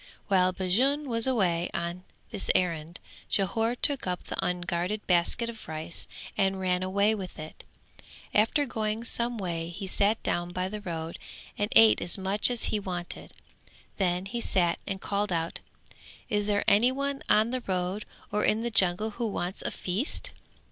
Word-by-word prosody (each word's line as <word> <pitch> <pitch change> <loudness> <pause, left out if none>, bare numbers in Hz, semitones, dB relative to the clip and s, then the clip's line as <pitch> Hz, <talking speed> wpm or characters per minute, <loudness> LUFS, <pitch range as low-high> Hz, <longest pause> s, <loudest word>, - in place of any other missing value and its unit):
While 185 -2 +4
Bajun 250 +11 +1
was 230 -1 +2
away 180 -9 +1
on 170 +2 -4 0.3
this 205 - -3
errand, 170 -2 0 0.3
Jhore 225 +4 +1
took 280 -8 +3
up 180 -1 -2
the - - -4
unguarded 180 +3 -2
basket 180 +6 +2
of 230 -1 -8
rice 160 +1 -3 0.3
and 195 0 +1
ran 180 -1 +1
away 200 +3 +2
with 190 -4 -6
it; 155 0 -9 0.7
after 225 +7 +3
going 220 -2 -2
some 235 0 -1
way 170 -4 -3
he 190 +3 -6
sat 205 +3 +1
down 175 0 -1
by 185 0 -1
the 210 +1 -5
road 165 -3 -5 0.4
and 205 0 -1
ate 225 -1 +7
as 175 - +2
much 195 +4 +2
as 245 -2 0
he 215 - +2
wanted, 180 -3 -6 0.6
then 180 -1 0
he 235 +4 -3
sat 175 -6 +2
and 195 -1 -3
called 205 0 -1
out 165 -1 -1 0.7
"Is 205 -2 0
there 205 -1 +2
anyone 260 +6 +3
on 220 +2 +4
the 255 0 -1
road 185 +2 -1 0.3
or 210 - 0
in 220 +2 +2
the 235 - -2
jungle 200 +2 +4
who 235 +2 -2
wants 185 -2 -3
a - - -2
feast?" 250 - -2
195 Hz, 165 wpm, -28 LUFS, 180-220 Hz, 0.7 s, ate